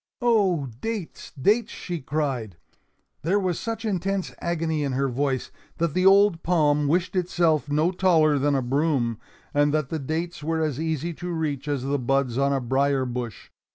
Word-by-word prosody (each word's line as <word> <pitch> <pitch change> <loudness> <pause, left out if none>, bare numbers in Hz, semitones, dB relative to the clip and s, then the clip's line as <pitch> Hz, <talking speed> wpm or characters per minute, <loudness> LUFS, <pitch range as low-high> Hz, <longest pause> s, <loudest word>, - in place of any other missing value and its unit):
"Oh, 200 - +2 0.2
dates, 225 -7 -5
dates!" 215 - +2
she 175 -3 -5
cried. 130 - -2 0.6
There 180 +6 +1
was 185 -4 -1
such 225 0 -4
intense 195 -1 -1
agony 160 -3 -1
in 140 -2 -1
her 135 +1 +1
voice 135 0 -1 0.3
that 165 -3 0
the 185 +2 +3
old 195 -3 +5
palm 150 -4 +2
wished 175 +5 0
itself 170 -5 +1
no 155 +4 +2
taller 160 -6 +3
than 145 +1 +2
a 135 - 0
broom 130 -4 0 0.3
and 145 0 +3
that 150 -3 -1
the 160 - -2
dates 160 +4 -3
were 160 +1 -1
as 150 -3 -2
easy 160 +1 -2
to 175 +3 -6
reach 150 -4 -2
as 140 -3 -1
the 140 +1 0
buds 130 -1 0
on 140 0 +2
a 135 - +1
brier 135 +2 +1
bush. 120 -5 -6
155 Hz, 175 wpm, -25 LUFS, 140-175 Hz, 0.6 s, old